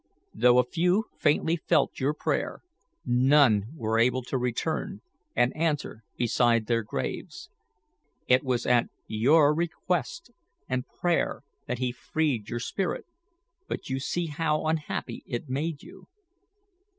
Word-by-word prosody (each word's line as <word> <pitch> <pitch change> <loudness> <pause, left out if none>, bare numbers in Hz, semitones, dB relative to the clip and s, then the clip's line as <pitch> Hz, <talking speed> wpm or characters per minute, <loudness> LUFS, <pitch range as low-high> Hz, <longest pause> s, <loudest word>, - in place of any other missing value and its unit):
Though 120 +2 +5
a 125 - +6
few 180 - +1
faintly 160 +2 +2
felt - - +1
your 145 +2 0
prayer, - - -2 0.4
none 125 -4 +4
were 115 -5 0
able 125 +2 +2
to 130 - -2
return 125 -1 -2 0.3
and 120 +2 +2
answer 150 -8 -1
beside 120 -1 +2
their 115 +1 +1
graves. 105 - -5 0.8
It 130 0 +4
was 125 -3 -1
at 120 -1 +3 0.2
your 145 +7 +4
request 180 - -2 0.4
and 130 0 -2
prayer 175 -5 -1 0.2
that 125 - -2
He 125 0 -1
freed 130 -3 -2
your 120 - -3
spirit, 180 +9 -2 0.6
but - - -5
you 130 - 0
see 175 +6 -2
how 155 0 -1
unhappy 155 -1 -2
it 120 +4 -4
made 145 +3 -2
you." - - -14
130 Hz, 130 wpm, -27 LUFS, 120-160 Hz, 0.8 s, a